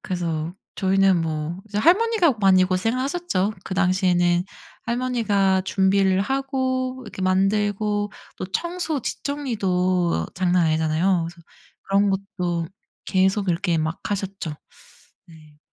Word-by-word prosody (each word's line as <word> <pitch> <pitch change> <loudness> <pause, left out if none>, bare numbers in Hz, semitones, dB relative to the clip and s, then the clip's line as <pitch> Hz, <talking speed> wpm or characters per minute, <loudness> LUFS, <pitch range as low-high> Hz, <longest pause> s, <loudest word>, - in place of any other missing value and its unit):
그래서 170 -2 -3 0.2
저희는 195 -2 +3
뭐 160 +2 -3
이제 205 - -6
할머니가 365 - +4
많이 185 -1 +5
고생하셨죠. 225 - -1
그 190 - -4
당시에는 180 -2 +2 0.4
할머니가 225 -6 +1
준비를 190 0 +2
하고 260 0 -2
이렇게 - - -9
만들고 205 +2 +1 0.3
또 185 - -4
청소 340 - -2
뒷정리도 185 - -1
장난 180 -2 +2
아니잖아요. 160 +3 +1
그래서 170 0 -14 0.4
그런 200 +1 +2
것도 180 -4 -2 0.4
계속 190 +1 +1
이렇게 170 0 0
막 160 +4 -2
하셨죠. 195 -5 -3 0.7
네. 155 -2 -18
190 Hz, 270 characters per minute, -23 LUFS, 175-215 Hz, 0.7 s, 많이